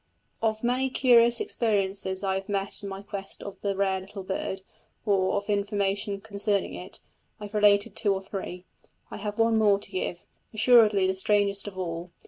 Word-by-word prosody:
Of 220 0 0
many 255 +2 +1
curious 240 -2 +4
experiences 195 -3 0
I 190 -1 +1
have 195 +2 -4
met 195 -1 -2
in 200 - -6
my 195 +1 -7
quest 195 -1 -7
of 200 - -9
the 200 -1 -1
rare 190 -1 +1
little 195 +1 -9
bird, 190 0 -4 0.4
or 190 -3 +2
of 200 - -2
information 200 -1 -1
concerning 200 -1 -1
it, 185 - -8 0.4
I - - -9
have 205 - -11
related 205 -1 +3
two 205 - +1
or 195 0 -2
three: 185 -2 -6 0.5
I - - -6
have 210 +1 -5
one 225 -1 +3
more 205 -2 +4
to 200 - -7
give 185 -2 -4 0.3
assuredly 220 -4 +5
the 190 - +1
strangest 200 +1 +2
of 195 -2 -8
all. 170 -1 -4
200 Hz, 180 wpm, -27 LUFS, 190-210 Hz, 0.5 s, assuredly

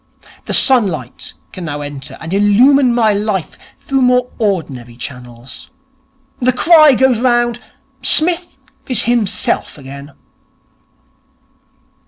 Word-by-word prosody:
The - - -4
sunlight 185 - +1 0.2
can 180 - -8
now 145 -2 -5
enter 145 -2 -8
and 165 +2 -7
illumine 245 +7 +3
my 220 -3 +2
life 205 -4 -3 0.2
through 275 -1 -2
more 250 0 +1
ordinary 150 - -3
channels. 125 0 -10 0.7
The 255 -1 +2
cry 305 +1 +5
goes 255 -2 +2
round, 240 -1 0 0.4
"Psmith 335 +4 +1 0.3
is 245 -3 +1
himself 235 -9 -1
again."' 140 +1 -11
215 Hz, 105 wpm, -15 LUFS, -, 0.7 s, cry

